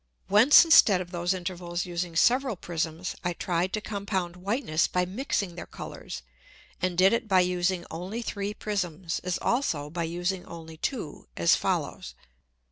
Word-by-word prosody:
Whence 225 - +8
instead 220 - +7
of 180 -1 -6
those 175 0 -1
Intervals 180 -1 -3
using 175 -1 -4
several 250 +6 +3
Prisms, 170 0 -3
I 175 -1 0
try'd 175 +1 -1
to 215 - -1
compound 195 -4 -3
Whiteness 180 - 0
by 180 0 0
mixing 200 -2 -2
their 175 - -8
Colours, 60 - -8 0.6
and 180 -1 -1
did 190 +4 +6
it 230 0 0
by 190 -3 +5
using 180 0 0
only 185 +8 -5
three 205 -1 -3
Prisms, 180 -5 -3
as 180 -1 -1
also 155 - 0
by 170 0 -2
using 175 +3 -2
only 160 -1 -10
two 185 - -4
as 85 0 +5
follows. 65 - -2
180 Hz, 155 wpm, -27 LUFS, 170-200 Hz, 0.6 s, Whence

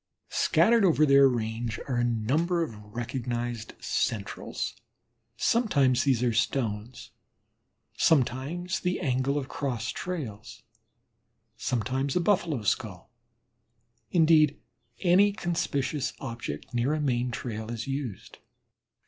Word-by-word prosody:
Scattered 230 -1 +4
over 160 -5 +5
their 140 -1 +7
range 115 -2 -3
are 130 -3 -1
a 120 - +2
number 145 +10 +1
of 115 -9 -6
recognized 120 +2 -4
"centrals." 110 -5 -2 0.6
Sometimes 140 - +3
these 130 -4 +2
are 120 -2 +2
stones, 115 0 -2 0.8
sometimes 160 +6 +1
the 180 0 -1
angle 135 -1 0
of 135 -3 -3
cross 125 -6 -3
trails, 130 - -6 0.9
sometimes 130 +3 -1
a - - +4
Buffalo 170 - +1
skull 105 -2 -2 1.0
indeed, 155 -3 +4 0.4
any 190 +3 +5
conspicuous 150 -7 -1
object 115 - -6
near 120 +5 +1
a - - -2
main 125 -4 0
trail 110 -2 -5
is 115 -1 -4
used. 135 -7 -5
130 Hz, 105 wpm, -28 LUFS, 115-155 Hz, 1.0 s, their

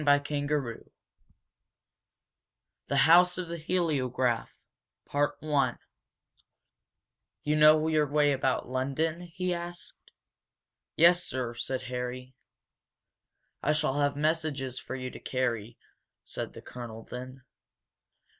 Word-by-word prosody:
CHAPTER 145 -1 +1
IV - - -21 2.0
THE 140 - 0
HOUSE 180 +3 +6
OF 180 -2 -3
THE 170 0 -4
HELIOGRAPH 135 -8 0 2.9
"You 150 +1 +1
know 155 +1 +6
your 155 -2 +2
way 145 0 +3
about 130 -1 0
London?" 140 +6 -1
he 180 +1 -3
asked. 175 0 -8 0.9
"Yes, 175 +2 +6
sir," 125 -2 -3
said 130 +2 -3
Harry. 125 +1 -5 1.3
"I 150 - +2
shall 150 -2 0
have 145 -1 +2
messages 150 -4 -1
for - - -6
you 130 -1 -5
to - - -10
carry," 120 -3 -2 0.5
said - - -5
the - - -11
colonel, 115 -2 -8
then. 130 +1 -8
145 Hz, 100 wpm, -29 LUFS, 130-160 Hz, 2.9 s, HOUSE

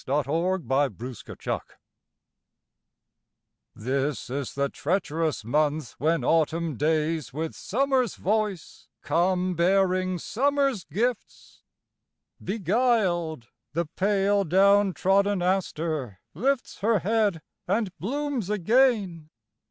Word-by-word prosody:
Helen 145 +3 +1 0.4
Hunt 135 -4 +1
Jackson 125 -1 -8
November - - -1 2.1
THIS 135 +3 -2
is 140 -1 -4
the 140 0 +1
treacherous 160 - -2
month 150 +1 0
when 160 +5 +1
autumn 165 -1 +1
days 155 -1 0
With 160 +4 -4
summer's 260 -1 0
voice 210 -3 -2 0.2
come 180 +1 +1
bearing 185 +1 +2
summer's 275 - 0
gifts. 230 - -3 0.8
Beguiled, 185 - 0 0.2
the 170 +2 0
pale 200 +4 +1
down 195 +2 +4
trodden 195 0 +2
aster 160 - -1
lifts 270 0 -1
Her 220 +2 +2
head 205 -5 +1 0.2
and 200 0 0
blooms 270 - -2
again. 210 -5 +2
180 Hz, 95 wpm, -26 LUFS, 155-210 Hz, 2.1 s, down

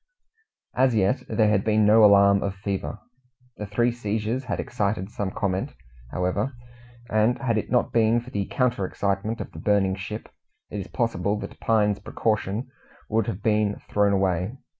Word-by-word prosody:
As 130 -2 +3
yet 105 +5 +2
there 110 -2 +3
had 100 -2 +2
been 110 -1 +3
no 110 +1 +6
alarm 100 -1 +6
of 100 -1 -2
fever. 95 -7 -4 0.6
The 105 - -5
three 120 +4 +1
seizures 115 +2 -2
had 125 - -3
excited 105 -3 -2
some 100 -3 -3
comment, 95 -1 -2 0.3
however, 95 - -1 0.6
and 110 +3 +3
had 120 -4 0
it 110 - -2
not 125 - +1
been 115 0 +3
for 125 +2 -11
the 100 -1 -2
counter 125 -6 0
excitement 100 +4 -2
of - - -7
the - - -10
burning 100 -2 +2
ship, 100 +3 -6 0.4
it 105 - -4
is 95 - -6
possible 105 -4 -1
that - - -8
Pine's 105 -2 +2
precaution 110 +2 -2 0.4
would 110 -1 +1
have 110 -2 -4
been 105 -2 +1
thrown 100 -1 +3
away. 95 +4 0
105 Hz, 165 wpm, -25 LUFS, 100-115 Hz, 0.6 s, no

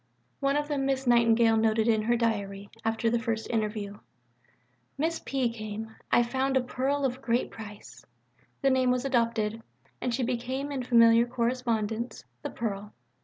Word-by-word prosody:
Of - - -43
one 275 0 +2
of 295 0 -1
them 280 -2 -1
Miss 270 0 0
Nightingale 230 -2 +4
noted 220 0 +2
in 220 -2 +3
her 235 +2 +2
diary, 200 -3 -2
after 225 +1 0
the 235 - +2
first 225 -2 -2
interview: 210 -2 -2 1.0
"Miss 325 +3 -1
P. 265 -2 0
came. 220 0 -6 0.2
I - - +6
have 235 - -7
found 265 +1 +1
a - - +3
pearl 270 +3 -1
of 260 0 -2
great 240 -1 0
price." 210 -2 -10 0.6
The 270 - +4
name 260 -1 +3
was 250 +1 +1
adopted, 230 -4 0 0.4
and 250 - -1
she 250 +2 0
became 255 +3 -2
in 270 -2 -2
familiar 235 -1 +5
correspondence 235 -2 -1 0.2
"The - - -4
Pearl." 210 -2 -4
235 Hz, 170 wpm, -28 LUFS, 220-260 Hz, 1.0 s, I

